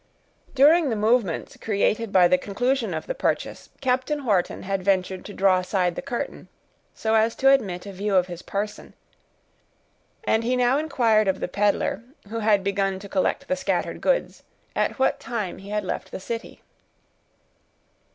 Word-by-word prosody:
During 300 +3 +5
the 225 - 0
movements 215 -4 0
created 215 +1 0
by 180 -2 +6
the 180 +1 +3
conclusion 245 +5 -1
of - - -4
the - - -3
purchase, - - -2
Captain 260 +2 0
Wharton 195 -6 0
had 195 0 -2
ventured 185 -1 0
to 205 - -8
draw 190 -1 +4
aside 180 -1 0
the - - -5
curtain, 240 - -5 0.5
so 220 0 -1
as 225 +1 +3
to 270 0 +5
admit 195 -10 +1
a 200 - -7
view 200 +1 -1
of 180 -1 +4
his 175 -1 -8
person, 205 +1 -5 1.3
and 220 - +1
he 250 +2 +1
now 250 +2 +3
inquired 230 -9 +2
of 190 0 +1
the - - -2
peddler, 205 +2 0 0.3
who 230 +1 -3
had 210 -3 +3
begun 195 -1 0
to 200 +1 -9
collect 200 +8 -1
the 275 - +1
scattered 275 0 -2
goods, - - 0 0.3
at - - 0
what 265 - +1
time 215 -7 -4
he 195 +1 -11
had 210 -1 -2
left - - -4
the - - -6
city. 230 +4 -6
210 Hz, 170 wpm, -24 LUFS, 190-245 Hz, 1.3 s, by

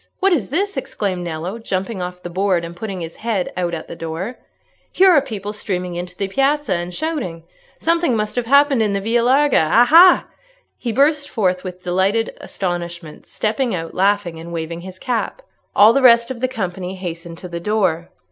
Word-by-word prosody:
what 390 0 +3
is 235 - -1
this?" 390 +4 -1
exclaimed 205 -9 -3
Nello, 175 +6 -5
jumping 195 -1 -3
off 180 0 -6
the 175 - -5
board, 185 -1 +1
and 170 +1 -9
putting 195 -1 -5
his 165 0 -7
head 220 -5 -2
out 175 -1 -1
at 160 - -7
the - - -8
door. 165 +9 -5 0.5
"Here 380 0 +5
are 300 -5 +5
people 210 -6 -6
streaming 180 -4 -3
into 180 +1 -6
the 195 - -1
piazza, 275 +6 +1
and 175 0 -3
shouting. 235 - -3 0.3
Something 335 -5 +1
must 210 -1 -2
have 245 -2 -2
happened 280 -1 +4
in 210 -2 +1
the 200 - 0
Via 230 +4 +1
Larga. 265 - +3
Aha!" 325 +10 +7 0.5
he 240 - -2
burst 285 +3 +2
forth 185 -6 0
with 180 -1 -8
delighted 190 +5 0
astonishment, 170 -3 -5
stepping 225 +1 -1
out 165 -1 -5
laughing 195 -3 +1
and 170 +1 -9
waving 165 0 -4
his 185 +1 -10
cap. 250 - -3 0.3
All 215 +3 +7
the 275 - +2
rest 235 -1 +6
of 245 -2 -7
the 255 - +2
company 190 -6 -4
hastened 170 -2 -7
to 180 - -8
the 170 -1 -5
door. 180 -4 0
195 Hz, 190 wpm, -19 LUFS, 175-245 Hz, 0.5 s, Aha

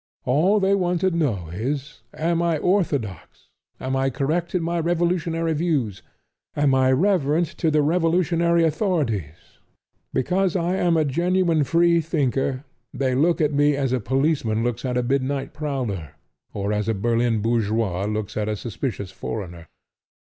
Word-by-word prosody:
All 170 +11 +3
they 195 0 +2
want 180 -3 +1
to 190 - +2
know 120 - -1
is; 135 +5 -4
Am 170 +1 0
I 170 -2 +1
orthodox? 145 - -2 0.3
Am 130 +1 -2
I 135 0 +1
correct 155 +7 -1
in 175 - +1
my 170 +1 -1
revolutionary 165 -1 0
views? 145 - -1 0.5
Am 145 -2 +2
I 130 0 +3
reverent 165 0 +2
to 165 - +2
the 150 -1 +2
revolutionary 170 +1 +2
authorities? 150 - -2 0.5
Because 180 +7 0
I 180 +1 0
am 175 -3 +2
a 155 - +2
genuine 170 +2 +1
free 170 +4 +3
thinker 135 -4 -1 0.3
they 130 -2 -1
look 160 +6 +2
at 150 -1 +2
me 145 0 +3
as 135 -2 -1
a 130 - +1
policeman 130 -1 0
looks 120 +1 -2
at 125 -1 -1
a 125 - +1
midnight 135 +2 -1
prowler 125 - -4 0.4
or 100 +1 -2
as 105 0 -1
a 110 - +1
Berlin 115 +2 +1
bourgeois 110 -4 0
looks 105 0 -3
at 105 0 -1
a 105 - -1
suspicious 105 - -5
foreigner. 85 -4 -6
145 Hz, 155 wpm, -23 LUFS, 115-170 Hz, 0.5 s, All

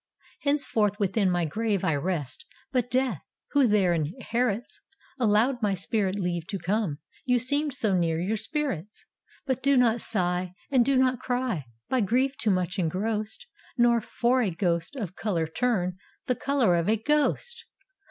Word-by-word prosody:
" - - -29
Henceforth 230 -8 +1
within 200 0 +2
my 175 -1 +1
grave 210 +3 -1
I 165 -4 +2
rest, 165 - -2 0.3
But 250 -2 0
Death, 255 - 0 0.3
who 280 -3 +4
there 200 -5 +3
inherits, 210 - -2 0.4
Allowed 240 +3 +2
my 205 -2 +1
spirit 195 +1 -1
leave 175 -4 -2
to 205 - -3
come, 195 -5 -1 0.3
You 250 -2 +3
seemed 285 +3 +2
so 215 -8 +1
near 165 -2 +1
your 190 +6 0
spirits: 215 - -3 0.4
But 260 -2 -1
do 275 0 +3
not 235 -2 +3
sigh, 180 -3 -1 0.2
and 255 -3 +5
do 270 +1 +2
not 255 -1 +3
ciy. 245 - -2 0.2
By 260 -2 +1
grief 255 +7 +1
too 225 - -1
much 185 -1 0
engrossed. 210 - -2 0.3
Nor 240 -1 +4
for 245 +4 +1
a 215 - +1
ghost 170 +3 -1
of 200 -9 -5
color 180 -7 -1
turn 185 0 -1 0.3
The 250 - +1
color 250 -8 +2
of 170 +3 0
a 220 - +3
ghost! 300 - 0
215 Hz, 160 wpm, -27 LUFS, 180-250 Hz, 0.4 s, and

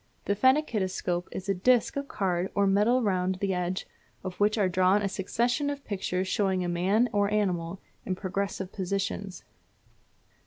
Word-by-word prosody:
The 200 - +1
phenakistoscope 205 - +1
is 190 - -6
a 195 - +2
disc 240 +6 +2
of 280 0 -3
card 185 -4 -1
or 200 - +3
metal 210 +6 +3
round 185 -2 +1
the 195 +1 -1
edge 180 +1 -2 0.4
of 185 -1 -6
which 210 +2 +3
are 200 -3 +3
drawn 185 +3 +3
a - - +1
succession 240 +8 0
of 285 -1 -5
pictures 190 -2 -2
showing 190 -2 +1
a - - -2
man 190 +7 +2
or 205 0 +2
animal 185 -4 0 0.2
in 185 - -2
progressive 195 0 -3
positions. 195 0 -3
195 Hz, 160 wpm, -28 LUFS, 185-210 Hz, 0.4 s, or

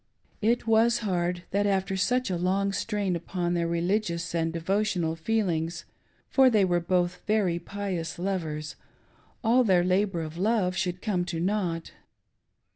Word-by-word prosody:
It 230 +3 +1
was 225 +1 +4
hard 175 -2 -1
that 205 +1 +1
after 195 -1 0
such 245 +4 +1
a - - 0
long 190 +3 +1
strain 200 -2 -1
upon 175 +1 -2
their 170 -1 0
religious 170 0 -1
and 165 -1 0
devotional 175 -1 0
feelings 170 -3 -1 0.2
— - - -39
for 265 -1 +6
they 215 -5 +4
were 175 -1 +2
both 180 0 0
very 200 -5 +2
pious 180 -3 -4
lovers— 165 -5 -3 0.7
all 240 +3 +4
their 185 -6 +4
labor 185 -1 +1
of 160 +2 -7
love 195 -3 +1
should 180 -1 -2
come 190 -5 0
to 175 -2 -4
nought. 175 -3 -1
185 Hz, 150 wpm, -27 LUFS, 170-205 Hz, 0.7 s, for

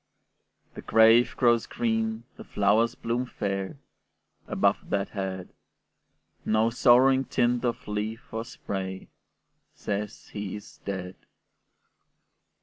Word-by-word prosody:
The - - -8
grave 115 +2 +5
grows 120 -2 +3
green, 110 -1 -1
the - - -10
flowers 110 +3 +2
bloom 120 +2 -2
fair, 100 0 -3 0.7
Above - - +1
that 100 -1 -1
head; 95 -2 -5 0.9
No 110 +1 +2
sorrowing 130 +2 +5
tint 120 0 +1
of 120 - -2
leaf 110 +4 -4
or 115 0 -2
spray 95 -5 -6 0.7
Says 105 +1 -5
he 100 -2 -5
is 80 -7 -11
dead. 95 -2 -4
110 Hz, 105 wpm, -27 LUFS, 100-120 Hz, 0.9 s, grave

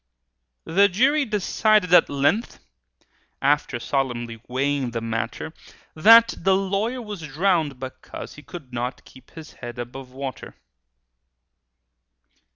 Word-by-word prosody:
The 200 +4 +4
jury 275 +9 +2
decided 210 -2 +2
at - - +7
length, 145 - 0 0.8
After 140 -3 +1
solemnly 120 -4 -2
weighing 135 +1 -1
the 115 -1 -3
matter, 115 0 -4 0.4
That 225 +8 +7
the 190 +2 +3
lawyer 200 +6 -1
was 210 -5 -7
drownded, 160 -1 0
because 130 0 -8
He 150 - -12
could 150 -5 -11
not 125 +2 -4
keep 130 - -17
his 160 -2 -11
head 120 -1 -9
above 125 +2 -8
water! 135 0 -7
150 Hz, 115 wpm, -23 LUFS, 130-200 Hz, 0.8 s, at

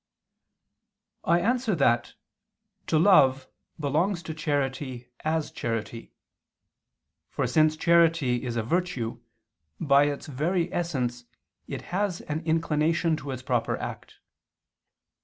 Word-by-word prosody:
I 170 +1 +3
answer 240 -1 +1
that, 120 -6 +1 0.7
To 160 - +2
love 135 -7 +5 0.3
belongs 165 +6 0
to 160 - -5
charity 135 -5 -3
as 160 0 -1
charity. 115 0 -4 1.2
For, - - -1
since 155 0 +3
charity 165 -7 +3
is 120 -2 -3
a 115 - 0
virtue, 125 -6 -2 0.6
by 140 0 +4
its 145 -1 -3
very 165 +5 -1
essence 125 -8 -2 0.4
it - - -6
has 195 -2 -1
an 150 +1 -3
inclination 160 +1 +1
to 140 -1 -8
its 130 -1 -5
proper 120 -2 0
act. - - -7
150 Hz, 110 wpm, -27 LUFS, 130-170 Hz, 1.2 s, love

